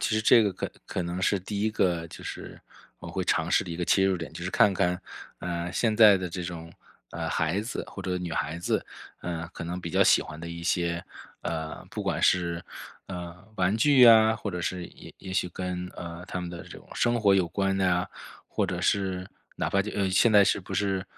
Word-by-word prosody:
其 115 - 0
实 110 - +1
这 115 +1 +7
个 100 -2 +1
可 90 - -5 0.2
可 - - -2
能 85 +1 -4
是 100 +1 +2
第 100 +2 -4
1 110 - +2
个 85 -6 0
就 - - -11
是 - - -8 0.4
我 - - -9
会 90 +1 -3
尝 85 -1 +1
试 - - +3
的 90 - -7
一 - - -5
个 90 - -1
切 95 +2 +3
入 95 -1 +2
点， 85 -2 -7
就 - - -7
是 - - -2
看 100 - +4
看， 90 -1 0 0.4
呃， 85 0 -3
现 110 +2 +1
在 105 -2 +8
的 95 -1 -4
这 90 +1 -5
种 85 -1 -7 0.4
呃， - - -4
孩 80 +5 0
子 110 - -4
或 - - -8
者 90 -1 -1
女 90 -2 -5
孩 80 0 -2
子， 85 - -1 0.4
呃， 85 -2 -4
可 - - -7
能 90 +2 -4
比 85 - -5
较 - - +4
喜 - - +5
欢 75 - -9
的 85 +1 -7
一 85 0 -7
些 85 0 0 0.4
呃， 80 -1 -4
不 - - -4
管 - - -1
是， 85 -2 +2 0.4
呃， 90 -2 -6 0.2
玩 95 +3 +2
具 135 +2 +5
呀， 110 -2 +8
或 105 - -5
者 90 -1 -4
是 90 0 -3
也 - - -13
也 95 - -8
许 90 - 0
跟， 90 0 -4
呃， 85 0 -7
他 90 - -4
们 90 - -5
的 85 -1 -7
这 - - -11
种 - - -20
生 120 -1 +1
活 100 -2 +5
有 95 -3 +2
关 95 +1 0
的 95 - +1
呀， 90 -1 +1 0.4
或 - - -1
者 - - -3
是 95 -2 0 0.3
哪 - - -1
怕 100 - +3
就 105 - -5
呃， 100 -2 0
现 100 +5 +4
在 105 -1 +7
是 - - +1
不 90 - -10
是， 95 -2 0
90 Hz, 250 characters per minute, -27 LUFS, 85-100 Hz, 0.4 s, 在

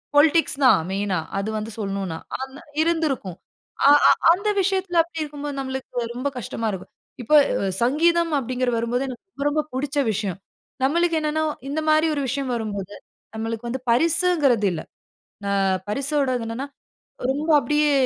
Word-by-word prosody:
Politics 305 +1 +4
தான் 255 - +6
மெயினா. 195 -1 -1 0.2
அது 200 +2 -2
வந்து 215 +1 -5
சொல்லணும்னா, 195 -5 -3 0.2
ஆனா 265 +1 -7 0.2
இருந்திருக்கும். 310 - -1 0.5
அ - - +8 0.2
அ - - +8 0.2
அந்த 395 +5 +1
விஷயத்தில. 380 -1 -1
அப்படி 330 -1 -7
இருக்கும்போது 290 -1 -6
நம்மளுக்கு 265 -2 -4
ரொம்ப 255 +4 -2
கஷ்டமா 230 -2 -3
இருக்கும். 190 -2 -8 0.3
இப்போ 275 +6 +2 0.3
அ 195 - 0
சங்கீதம் 335 +5 +2
அப்பிடீங்கிற 255 0 -1
வரும்போது, 235 +3 -1
எனக்கு 255 +3 -8
ரொம்ப 280 -4 -5
ரொம்ப 305 +1 0
புடிச்ச 275 +3 -3
விஷயம். 195 -3 -3 0.4
நம்மளுக்கு 335 +4 +2
என்னென்னா, 310 +1 0 0.3
இந்த 295 +3 -1
மாரி 310 +1 +4
ஒரு 285 - -1
விஷயம் 260 +1 -2
வரும்போது, 205 -3 -4 0.4
நம்மளுக்கு 225 +1 -4
வந்து 260 +1 -3
பரிசுங்கிறது 310 - +3
இல்ல. 160 - -4 0.7
அ - - 0 0.4
பரிசோடது 270 0 0
என்னென்னா 240 +5 -4 0.6
ரொம்ப 290 +4 -2
அப்படியே 295 0 +2
270 Hz, 145 wpm, -23 LUFS, 230-310 Hz, 0.7 s, அ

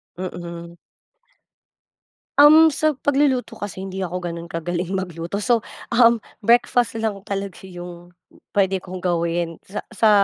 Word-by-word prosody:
Mm. 170 -1 -7 1.6
Um, 310 +3 +8
sa 310 +1 +1
pagluluto 270 -4 +1
kasi 200 -3 -6
hindi 190 0 -6
ako 180 +1 -4
ganun 170 0 -6
kagaling 175 +2 -3
magluto 180 +1 -3
so, 235 0 +2 0.2
um, 235 -2 +5 0.2
breakfast 240 0 +3
lang 220 -3 -2
talaga 195 -1 -5
yung 175 -1 -10 0.4
pwede 195 -1 +2
kong 185 0 -8
gawin 170 -1 -1
sa 200 - -5
sa, 225 -1 +3
190 Hz, 125 wpm, -22 LUFS, 175-235 Hz, 1.6 s, Um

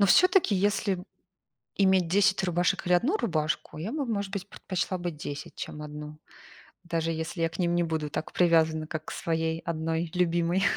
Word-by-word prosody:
Но 200 - +6
всё-таки, 360 - +5
если 200 0 +1 0.8
иметь 190 -3 +4
10 190 +1 +3
рубашек 175 0 +1
или 180 - +2
1 280 - +3
рубашку, 155 - -1
я 195 - -4
бы, 290 -4 -2
может 200 -4 -2
быть, 200 0 -4
предпочла 185 0 -3
бы 175 0 -2
10, 145 -2 -7
чем 150 - -6
1, 150 0 -8 0.7
даже 165 -1 -1
если 160 +2 -3
я 165 - +3
к 165 - -11
ним 175 -1 +1
не 175 - +3
буду 160 -3 -2
так 155 - -4
привязана, 160 -3 +3
как 155 0 -5
к - - -6
своей 160 0 -1
1 165 0 -2
любимой 175 +1 +2
170 Hz, 180 wpm, -28 LUFS, 160-190 Hz, 0.8 s, Но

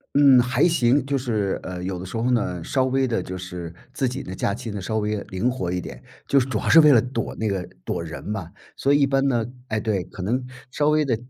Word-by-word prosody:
嗯， 140 -3 +7
还 125 +6 +2
行， 135 -4 +3
就 140 0 0
是， 110 -6 -1
呃， 90 -1 -6
有 90 -1 -3
的 - - -6
时 95 +5 -5
候 120 +3 +1
呢， 90 -8 0
稍 130 -1 +1
微 130 0 +1
的 115 -6 0
就 95 +1 -6
是 90 -2 -7 0.2
自 130 - 0
己 135 +3 -5
的 95 - -7
假 100 +1 -1
期 115 -2 -6
呢， 100 -2 -5
稍 110 +4 -2
微 105 -1 -1
灵 100 +7 -1
活 90 -9 -3
一 90 - -1
点， - - -8 0.3
就 140 - +4
是 130 - -1
主 110 - 0
要 - - -4
是 165 - +8
为 150 -2 +8
了 120 - +7
躲 120 -1 -3
那 110 - -2
个 95 -3 -1 0.2
躲 85 - -2
人 80 -1 -7
嘛， 100 -5 -5 0.2
所 140 - +1
以 145 - +5
一 - - +6
般 135 0 +1
呢， 120 -4 +1 0.2
诶 110 - -1
对， 105 -4 -1
可 95 - -8
能 125 +7 0 0.3
稍 145 +2 +1
微 150 0 +3
的 125 -4 +1
115 Hz, 280 characters per minute, -23 LUFS, 95-135 Hz, 0.3 s, 是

